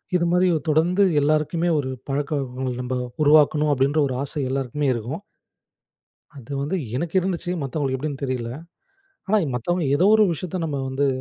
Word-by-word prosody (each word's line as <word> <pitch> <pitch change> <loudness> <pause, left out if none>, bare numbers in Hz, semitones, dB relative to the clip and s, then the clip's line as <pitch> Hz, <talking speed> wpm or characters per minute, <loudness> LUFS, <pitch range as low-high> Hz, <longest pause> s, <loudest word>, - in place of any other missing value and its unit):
இதுமாதிரி 180 +1 +3 0.2
தொடர்ந்து 170 +6 +3 0.2
எல்லாருக்குமே 155 +3 +1
ஒரு 130 -2 -3 0.2
பழக்கவழக்கங்கள், 135 -2 -2
நம்ப 125 +1 -3 0.3
உருவாக்கணும் 150 0 +4
அப்படின்ற 140 +3 +1
ஒரு 130 - -3
ஆசை 145 +1 -4
எல்லோருக்குமே 135 +1 -1
இருக்கும். 125 - -5 1.1
அது 130 -3 -12
வந்து 150 +7 -1 0.2
எனக்கு 170 +5 -3
இருந்துச்சு, 180 -1 -3
மத்தவங்களுக்கு 135 -1 -1
எப்படின்னு 140 0 -5
தெரியல. 125 -3 -3 0.8
ஆனா 215 +2 +3 0.2
மத்தவங்க 175 +8 -1
ஏதோ 180 - +3
ஒரு 215 - +5
விஷயத்த 180 +3 -5
நம்ம 145 -3 -3
வந்து 140 +2 0
145 Hz, 140 wpm, -23 LUFS, 135-170 Hz, 1.1 s, ஒரு